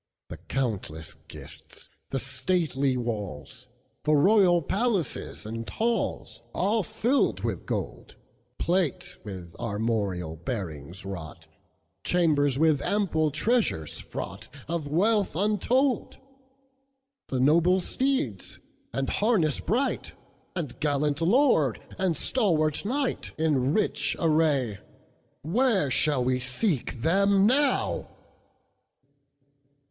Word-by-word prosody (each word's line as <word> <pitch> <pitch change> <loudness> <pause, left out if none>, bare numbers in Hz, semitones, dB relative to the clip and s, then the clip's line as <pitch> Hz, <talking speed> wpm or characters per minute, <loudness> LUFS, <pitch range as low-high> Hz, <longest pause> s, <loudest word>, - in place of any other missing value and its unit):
The - - -7
countless 100 - -3
gifts, - - -12 0.2
the 135 - -1
stately 135 0 0
walls, 105 -11 -5 0.4
The 155 0 +3
royal 180 +1 +5
palaces, 195 - -1
and 115 +1 -5
halls, 230 +1 -2
All 210 +4 +2
filled 240 - 0
with - - -3
gold; - - -4 0.4
Plate 175 -5 -1
with 95 -5 -8
armorial 100 -7 -2
bearings 85 - -6
wrought, 85 -4 -7 0.6
Chambers 145 -6 +2
with 155 -2 +3
ample 175 -7 +1
treasures 155 - 0
fraughtOf 165 -3 -6
wealth 200 +6 +2
untold; 225 - +1 1.1
The 130 - -2
noble 170 +7 +4
steeds, 185 - -2 0.3
and 135 0 -2
harness 200 - +2
bright, 255 +6 -1 0.4
And 155 -9 -4
gallant 145 0 0
lord, 175 - +3 0.2
and 185 -5 +1
stalwart 160 - +1
knight, 265 +3 -2
In 145 -4 +2
rich 215 - 0
array, 150 - +2 0.6
Where 195 - +2
shall 145 -1 +2
we 125 0 +1
seek 130 - -2
them 195 +4 +4
now? 275 +6 +2
155 Hz, 95 wpm, -27 LUFS, 125-200 Hz, 1.1 s, royal